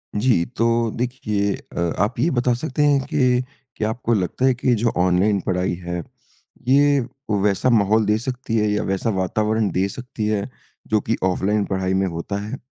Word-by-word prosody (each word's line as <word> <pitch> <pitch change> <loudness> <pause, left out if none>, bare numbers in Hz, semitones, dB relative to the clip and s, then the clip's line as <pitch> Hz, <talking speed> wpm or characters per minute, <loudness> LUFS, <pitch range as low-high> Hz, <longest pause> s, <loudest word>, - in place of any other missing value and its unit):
जी, 105 -5 +2
तो 115 0 0
देखिए 105 -5 -1
अ, - - -9 0.2
आप 105 +4 0
ये 165 - +3
बता 125 -2 +2
सकते 140 +3 -1
हैं 145 -1 +4
कि 125 -1 +2 0.3
कि - - -3
आपको 115 +1 -1
लगता 105 +5 0
है 130 - +5
कि 125 0 +1
जो 115 +2 +1
ऑनलाइन 95 +3 +3
पढ़ाई 90 -1 0
है, 85 0 -4 0.7
ये 140 +1 +5 0.4
वैसा 105 +5 +2
माहौल 110 -1 +3
दे 105 +1 +2
सकती 125 -1 -3
है 105 -1 +2
या 105 - 0
वैसा 95 +4 -1
वातावरण 105 +3 0
दे 95 +2 +1
सकती 120 -1 -5
है 105 +2 -1 0.4
जो 110 -1 +2
कि 115 - -1
ऑफ़लाइन 100 +3 +1
पढ़ाई 95 -1 -1
में 95 +1 +2
होता 85 +3 -4
है? 105 +2 -5
110 Hz, 180 wpm, -22 LUFS, 95-125 Hz, 0.7 s, है